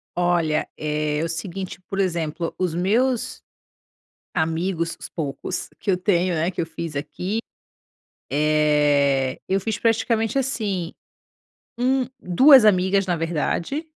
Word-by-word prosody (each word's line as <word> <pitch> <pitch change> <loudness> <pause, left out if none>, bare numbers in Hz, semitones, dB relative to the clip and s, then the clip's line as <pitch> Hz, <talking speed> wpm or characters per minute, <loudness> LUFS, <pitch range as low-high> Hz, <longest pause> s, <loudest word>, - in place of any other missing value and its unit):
Olha, 175 -3 +1
eh, 150 0 -1
o 165 - -2
seguinte, 180 +3 -5
por 195 - -3
exemplo, 170 -3 -1
os 180 -3 -1
meus 225 +8 0 0.9
amigos, 165 +1 -1
os - - -7
poucos, 140 -5 -4
que 205 - -1
eu 180 - +3
tenho, 180 -1 +1
né, 165 +3 0
que 180 - -4
eu 165 - -1
fiz 165 -2 -6
aqui, 155 +9 -3 0.9
eh, 145 -3 +2
eu 195 +1 +1
fiz 215 +2 -2
praticamente 225 +1 +1
assim, 205 -10 -2 0.8
um 255 +1 +2 0.2
2 255 - +7
amigas 190 0 +3
na 175 - +1
verdade, 170 - -2
175 Hz, 125 wpm, -23 LUFS, 155-200 Hz, 0.9 s, 2